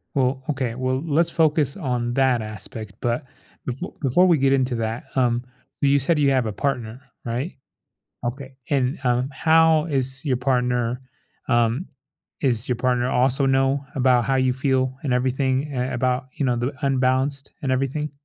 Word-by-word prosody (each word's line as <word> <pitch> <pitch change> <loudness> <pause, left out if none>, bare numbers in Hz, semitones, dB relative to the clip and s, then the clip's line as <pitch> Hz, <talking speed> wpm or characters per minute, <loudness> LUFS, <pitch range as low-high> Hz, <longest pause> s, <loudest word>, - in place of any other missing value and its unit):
Well, 130 0 +1
okay. 130 -5 -1
Well, 130 +1 -1
let's 165 +2 +2
focus 155 -4 +2
on 125 -8 -2
that 130 -2 +2
aspect, 110 0 -7
but 120 +2 -1 0.4
bef 125 +1 -5 0.2
before 160 +7 +4
we 170 -3 +5
get 135 0 +3
into 130 -2 +1
that, 115 +2 -3
um, 120 -2 +2 0.4
you 140 0 +4
said 150 +4 +1
you 140 -1 +4
have 130 -3 +2
a 110 - -2
partner, 125 -1 -3 0.2
right? 125 +9 -3 0.7
Okay. 130 +2 -5
And, 135 -2 +1
um, 125 +1 +1
how 160 +1 +4
is 135 -4 -2
your 130 -4 +1
partner 125 -1 0 0.5
um, 120 +7 +2 0.5
is 120 -5 +1
your 125 - +2
partner 125 0 +1
also 130 +2 +2
know 135 +1 +2
about 125 -2 +3
how 135 - +1
you 130 -1 +2
feel 130 -1 0
and 135 -4 0
everything, 130 +3 0
eh, 125 0 -2
about, 125 +1 0
you 140 - -2
know, 125 -2 +2
the 120 +4 -2
unbalanced 135 +1 +1
and 135 - -1
everything? 135 +3 -1
130 Hz, 165 wpm, -23 LUFS, 125-140 Hz, 0.7 s, we